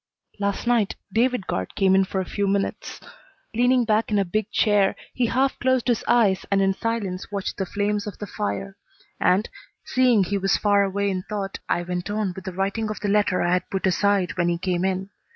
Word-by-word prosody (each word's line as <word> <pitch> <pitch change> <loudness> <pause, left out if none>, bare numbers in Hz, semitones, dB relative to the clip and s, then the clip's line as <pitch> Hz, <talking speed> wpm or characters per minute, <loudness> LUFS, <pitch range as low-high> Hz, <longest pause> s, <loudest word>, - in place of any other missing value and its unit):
Last 200 +2 -1
night 235 -4 +2 0.2
David 245 -2 +1
Guard 95 - -3
came 190 -1 +3
in 190 0 +4
for 190 - -3
a 190 - -2
few 200 +1 -2
minutes. 195 0 -2 0.5
Leaning 245 +1 +3
back 220 0 +1
in 210 - +1
a 200 - +2
big 215 +4 -2
chair, 205 -3 +3 0.2
he 245 -2 +1
half 265 +4 +1
closed 260 -1 +1
his 240 -2 +1
eyes 210 -6 +3
and 200 - +2
in 195 0 +3
silence 205 -4 -3
watched 200 -2 -3
the 190 - -2
flames 205 +1 -1
of 205 - -6
the 210 - -5
fire, 195 -1 -4 0.4
and, 190 +4 +3 0.4
seeing 250 -5 +3
he 200 +2 -1
was 195 0 +2
far 205 -1 +3
away 200 0 0
in 185 -1 -2
thought, 200 -2 -4
I 175 - +1
went 180 +2 -4
on 205 -3 -1
with 190 - -9
the 190 - -3
writing 200 +4 -1
of 215 - -4
the 205 - -2
letter 205 -3 +2
I 175 +1 +2
had 180 0 -1
put 195 -1 -2
aside 190 -2 +1
when 175 0 +2
he 170 - 0
came 180 0 -1
in. 190 +1 -1
200 Hz, 215 wpm, -24 LUFS, 190-215 Hz, 0.5 s, in